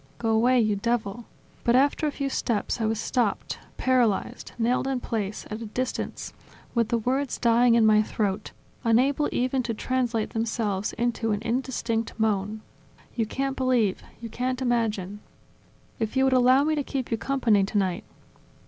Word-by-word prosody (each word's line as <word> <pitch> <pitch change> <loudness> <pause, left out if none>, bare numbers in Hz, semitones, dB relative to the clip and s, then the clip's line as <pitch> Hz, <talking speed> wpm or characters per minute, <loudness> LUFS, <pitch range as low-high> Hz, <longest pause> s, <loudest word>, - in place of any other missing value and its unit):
Go 225 - -2
away, 245 +3 +4
you 215 -2 +2
devil!.. 230 +1 -2 0.2
." - - -30
But 235 - +3
after 285 +3 +3
a - - 0
few 280 -1 -3
steps 235 -3 -1
I 220 - +1
was 220 0 -1
stopped, 230 -4 -1 0.2
paralyzed, 245 -6 +1
nailed 240 +3 +1
in 265 -2 0
place, 215 -4 -3
at 215 +2 -5
a 225 - -5
distance, 255 +4 -4 0.4
with 235 -2 +2
the 235 - +2
words 260 +4 -1
dying 235 0 +4
in 230 -1 +5
my 215 0 +6
throat, 205 -1 -2 0.3
unable 265 +6 +3
even 255 +1 0
to 230 -2 -3
translate 240 -2 -1
themselves 220 -3 -1
into 235 -2 -1
an 205 - -2
indistinct 235 -2 -2
moan... 215 0 0 0.5
You 225 -3 0
can't 270 +3 -2
believe, 250 -7 +1 0.2
you 235 - -6
can't 255 +3 -2
imagine 220 -6 -1 0.4
..." - - -33
"If 225 +3 -2
you 265 - +4
would 265 -1 +3
allow 255 +2 +5
me 310 +1 +1
to 295 -2 0
keep 265 -3 -4
you 230 - +1
company 235 -7 +2
tonight 190 -3 -1
235 Hz, 170 wpm, -26 LUFS, 215-255 Hz, 0.5 s, my